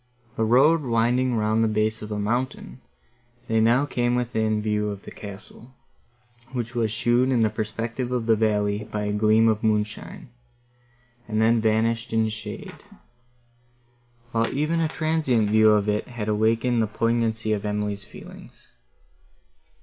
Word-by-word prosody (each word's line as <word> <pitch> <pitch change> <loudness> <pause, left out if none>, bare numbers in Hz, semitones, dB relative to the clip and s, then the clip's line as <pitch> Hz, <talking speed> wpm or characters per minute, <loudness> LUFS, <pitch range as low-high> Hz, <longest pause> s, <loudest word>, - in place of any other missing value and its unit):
The 110 - 0
road 135 +9 +4
winding 120 0 +1
round 110 +1 +1
the - - +3
base 110 0 0
of 105 0 -8
a 105 - -2
mountain, 120 +5 -3 0.7
they 110 0 +1
now 120 +5 +3
came 120 -3 0
within 110 -3 0
view 105 0 -1
of 100 -1 -7
the - - -10
castle, 105 +5 -11 0.8
which 120 -2 -4
was 115 -2 0
shown 120 +3 +2
in 120 -3 +3
the 110 - +1
perspective 115 +3 -4
of 125 -2 -1
the 115 -1 +4
valley 105 -1 0
by 105 -1 -4
a 105 0 -2
gleam 110 +2 +3
of 110 0 +1
moonshine, 110 - -2 1.0
and 110 -1 -1
then 115 +1 +3
vanished 115 +2 0
in 110 -1 +2
shade; 110 -1 -8 1.5
while 115 0 0
even 155 +4 0
a 165 - +1
transient 150 -10 0
view 110 0 +5
of 105 -1 +3
it 105 0 -1
had 120 -4 -6
awakened 115 +3 +1
the 110 - +1
poignancy 110 0 0
of 105 - -3
Emily's 105 -1 -3
feelings. - - -13
110 Hz, 150 wpm, -24 LUFS, 105-120 Hz, 1.5 s, view